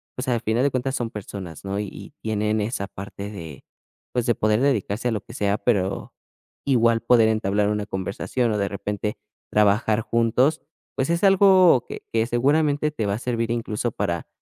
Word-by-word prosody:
pues, 125 Hz, +2 st, -5 dB
al 120 Hz, -3 st, +1 dB
final 115 Hz, +2 st, +1 dB
de 140 Hz, -, +2 dB
cuentas 130 Hz, +1 st, -1 dB
son 120 Hz, -3 st, -3 dB
personas, 95 Hz, -5 st, -8 dB
¿no? 100 Hz, +1 st, -3 dB
Y 105 Hz, -1 st, -7 dB
tienen 110 Hz, 0 st, 0 dB
esa 105 Hz, -2 st, -2 dB
parte 100 Hz, +1 st, -8 dB
de, 80 Hz, -9 st, -9 dB, 0.5 s
pues, 125 Hz, -2 st, 0 dB
de 120 Hz, -, +3 dB
poder 110 Hz, +1 st, +1 dB
dedicarse 120 Hz, -3 st, 0 dB
a -, -, -1 dB
lo 110 Hz, -3 st, -2 dB
que -, -, -13 dB
sea, 100 Hz, 0 st, 0 dB
pero 100 Hz, -4 st, -1 dB, 0.5 s
igual 115 Hz, -4 st, +3 dB
poder 120 Hz, -2 st, +5 dB
entablar 105 Hz, -1 st, +1 dB
una 105 Hz, -1 st, -1 dB
conversación, 100 Hz, +5 st, -2 dB
o 105 Hz, -, 0 dB
de 100 Hz, -1 st, 0 dB
repente, 105 Hz, +1 st, -3 dB, 0.3 s
trabajar 105 Hz, +1 st, +3 dB
juntos, 115 Hz, +6 st, +2 dB, 0.3 s
pues, 135 Hz, +2 st, -1 dB
es 170 Hz, +2 st, 0 dB
algo 190 Hz, -, +6 dB
que -, -, -8 dB
que 115 Hz, 0 st, +2 dB
seguramente 145 Hz, +4 st, +2 dB
te 115 Hz, -8 st, -3 dB
va 100 Hz, -, 0 dB
a -, -, -5 dB
servir 115 Hz, -2 st, -2 dB
incluso, 115 Hz, 0 st, -2 dB
para 85 Hz, -5 st, -2 dB
110 Hz, 185 wpm, -23 LUFS, 105-125 Hz, 0.5 s, algo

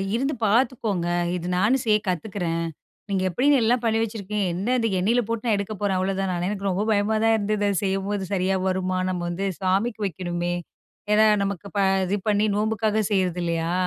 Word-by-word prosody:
இருந்து 270 Hz, +5 st, 0 dB
பாத்துக்கோங்க. 220 Hz, -5 st, +1 dB, 0.3 s
இது 175 Hz, -1 st, -4 dB
நானும் 220 Hz, +8 st, +2 dB
செய்ய 215 Hz, -2 st, +4 dB
கத்துக்கிறேன். 175 Hz, -2 st, -2 dB, 0.4 s
நீங்க 190 Hz, -2 st, 0 dB
எப்படின்னு, 265 Hz, -, +3 dB
எல்லாம் 235 Hz, +2 st, +2 dB
பண்ணி 225 Hz, -1 st, +2 dB
வச்சிருக்கீங்க. 210 Hz, -2 st, -2 dB
என்ன 200 Hz, +8 st, -1 dB
இது 225 Hz, -1 st, +1 dB
எண்ணெயில 230 Hz, +7 st, +2 dB
போட்டு, 230 Hz, 0 st, -3 dB
நான் 225 Hz, -3 st, +3 dB
எடுக்க 200 Hz, +2 st, -3 dB
போறேன்," 200 Hz, -2 st, +1 dB
அவ்ளோ 190 Hz, +1 st, 0 dB
தானே! 190 Hz, -2 st, -1 dB
எனக்கு 200 Hz, -1 st, -3 dB
ரொம்ப 190 Hz, +2 st, 0 dB
பயமா 210 Hz, +1 st, +2 dB
தான் 225 Hz, 0 st, +4 dB
இருந்தது, 210 Hz, 0 st, -1 dB
அது 200 Hz, -, 0 dB
செய்யம்போது. 195 Hz, +1 st, -1 dB
"சரியா 190 Hz, 0 st, +1 dB
வருமா? 185 Hz, 0 st, 0 dB
நம்ம 180 Hz, -1 st, -2 dB
வந்து 180 Hz, +3 st, -3 dB, 0.2 s
சாமிக்கு 200 Hz, +5 st, 0 dB
வைக்கணுமே." 175 Hz, -1 st, -3 dB, 0.6 s
ஏன்னா 215 Hz, +1 st, +5 dB, 0.2 s
நமக்கு 200 Hz, 0 st, -4 dB
ப -, -, +1 dB, 0.3 s
இது 190 Hz, +3 st, 0 dB
பண்ணி 210 Hz, 0 st, +3 dB
நோம்புக்காக 220 Hz, 0 st, 0 dB
செய்றது 185 Hz, -3 st, +1 dB
இல்லையா. 165 Hz, 0 st, -1 dB
200 Hz, 175 wpm, -24 LUFS, 185-220 Hz, 0.6 s, ஏன்னா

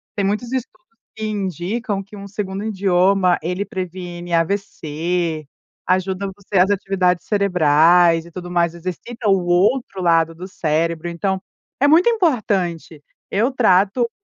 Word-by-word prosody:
Tem 200 Hz, -, 0 dB
muitos 215 Hz, +5 st, -2 dB
estudos 350 Hz, +8 st, -5 dB, 0.3 s
que 220 Hz, -, -4 dB
indicam 200 Hz, -, -3 dB
que 200 Hz, +2 st, -14 dB
um 200 Hz, 0 st, -8 dB
segundo 195 Hz, 0 st, -4 dB
idioma 190 Hz, -3 st, +2 dB
ele 180 Hz, +4 st, -2 dB
previne 175 Hz, -2 st, -6 dB
AVC, 165 Hz, -3 st, -1 dB, 0.4 s
ajuda 185 Hz, +1 st, 0 dB
você 200 Hz, -1 st, -4 dB
as 185 Hz, +2 st, +4 dB
atividades 190 Hz, -3 st, 0 dB
cerebrais 170 Hz, -3 st, +4 dB
e 170 Hz, -, -14 dB
tudo 175 Hz, 0 st, -8 dB
mais, 170 Hz, -1 st, +1 dB
exercita 185 Hz, +7 st, -6 dB
o 190 Hz, -3 st, +2 dB
outro 195 Hz, +5 st, +1 dB
lado 165 Hz, -2 st, +2 dB
do 180 Hz, +3 st, -8 dB
cérebro, 165 Hz, -1 st, -1 dB
então, 190 Hz, +3 st, -2 dB, 0.4 s
é 285 Hz, -, +4 dB
muito 335 Hz, +9 st, +5 dB
importante. 200 Hz, -, 0 dB, 0.3 s
Eu 225 Hz, +7 st, +1 dB
trato 220 Hz, 0 st, +3 dB
185 Hz, 135 wpm, -20 LUFS, 175-205 Hz, 0.4 s, muito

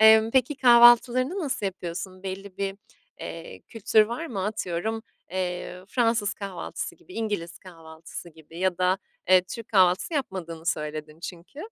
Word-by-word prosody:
Emm, 220 Hz, 0 st, +7 dB
peki 260 Hz, +3 st, +2 dB
kahvaltılarını 245 Hz, +5 st, +6 dB
nasıl 270 Hz, -, -2 dB
yapıyorsun? 185 Hz, 0 st, -6 dB
Belli 190 Hz, 0 st, -6 dB
bir, 195 Hz, 0 st, -2 dB, 0.4 s
eee, 165 Hz, -, -8 dB
kültür 220 Hz, -1 st, +3 dB
var 240 Hz, +8 st, -4 dB
mı? 200 Hz, -, -3 dB
Atıyorum, 210 Hz, +1 st, -2 dB, 0.3 s
eee, 180 Hz, 0 st, -4 dB
Fransız 230 Hz, -3 st, +1 dB
kahvaltısı 195 Hz, -3 st, -5 dB
gibi, -, -, -17 dB
İngiliz 205 Hz, -7 st, -3 dB
kahvaltısı 165 Hz, -1 st, -11 dB
gibi 160 Hz, +1 st, -14 dB
ya 185 Hz, -1 st, 0 dB
da, 185 Hz, +1 st, +2 dB, 0.3 s
eee, 185 Hz, -1 st, +7 dB
Türk 230 Hz, +2 st, -7 dB
kahvaltısı 185 Hz, -, +3 dB
yapmadığını 175 Hz, -, -4 dB
söyledin 155 Hz, 0 st, -3 dB
çünkü. 175 Hz, -, -9 dB
190 Hz, 140 wpm, -26 LUFS, 175-225 Hz, 0.4 s, Emm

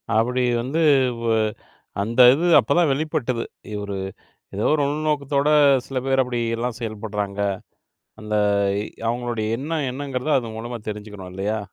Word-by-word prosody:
அப்பிடி 125 Hz, +3 st, +2 dB, 0.2 s
வந்து, 140 Hz, +7 st, -1 dB, 0.4 s
வ் 115 Hz, -, +1 dB, 0.7 s
அந்த 115 Hz, +4 st, -3 dB
இது 165 Hz, +6 st, 0 dB
அப்ப -, -, +1 dB
தான் 170 Hz, -4 st, +3 dB
வெளிப்பட்டது. 135 Hz, -5 st, -1 dB, 0.4 s
ஒரு 100 Hz, -1 st, -4 dB, 0.6 s
ஏதோ 105 Hz, -, 0 dB
ஒரு 155 Hz, -, +2 dB
உள்நோக்கத்தோட 145 Hz, -1 st, 0 dB, 0.4 s
சில 135 Hz, -, -4 dB
பேர் 135 Hz, 0 st, +3 dB
அப்பிடி 125 Hz, -2 st, -2 dB, 0.2 s
எல்லாம் 120 Hz, -1 st, -3 dB
செயல்படுறாங்க. 105 Hz, -3 st, -4 dB, 0.8 s
அந்த 105 Hz, 0 st, -3 dB, 0.7 s
அவுங்களுடைய 120 Hz, -2 st, -2 dB
எண்ணம் 150 Hz, +1 st, -2 dB
என்னங்கிறத 135 Hz, +1 st, -3 dB
அது 115 Hz, -2 st, -7 dB
மூலமா 120 Hz, +2 st, -5 dB
தெரிஞ்சுக்கணும், 105 Hz, -3 st, -8 dB
இல்லயா! 105 Hz, +3 st, -2 dB
120 Hz, 130 wpm, -22 LUFS, 110-140 Hz, 0.8 s, தான்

